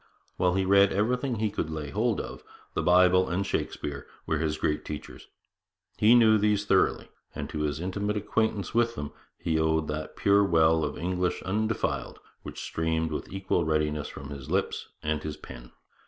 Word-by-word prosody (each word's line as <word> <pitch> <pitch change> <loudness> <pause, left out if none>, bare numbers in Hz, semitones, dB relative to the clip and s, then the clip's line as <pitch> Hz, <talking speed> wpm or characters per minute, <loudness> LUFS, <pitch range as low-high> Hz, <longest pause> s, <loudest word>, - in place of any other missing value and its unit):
While 90 0 +2
he 95 0 +1
read 100 +1 +5
everything 125 +5 0
he 110 -1 -1
could 80 - -3
lay 75 -2 -5
hold 110 +1 0
of, - - -7 0.3
the - - 0
Bible 90 +1 +5
and 95 +3 -1
Shakespeare 70 -6 -3 0.2
were 80 - 0
his 75 -1 -1
great 75 0 -1
teachers. 75 -1 -8 0.7
He 110 +3 +6
knew 110 -2 +6
these 105 0 +2
thoroughly, 95 -2 +2 0.3
and - - -4
to 75 - -4
his 75 -1 -1
intimate 100 +4 -2
acquaintance 105 -1 -1
with 115 0 +2
them 75 0 -5 0.3
he 80 -1 0
owed 80 0 +1
that 75 +1 -4
pure 100 0 +4
well 80 -3 +3
of 75 - -3
English 90 +1 -1
undefiled 110 +3 -2 0.2
which - - -8
streamed 80 0 -1
with 75 - -5
equal 95 -2 0
readiness 75 -1 0
from 70 +1 -9
his 70 -3 -8
lips - - -1 0.2
and 75 0 -1
his 75 -1 -5
pen. - - -11
90 Hz, 175 wpm, -28 LUFS, 75-100 Hz, 0.7 s, He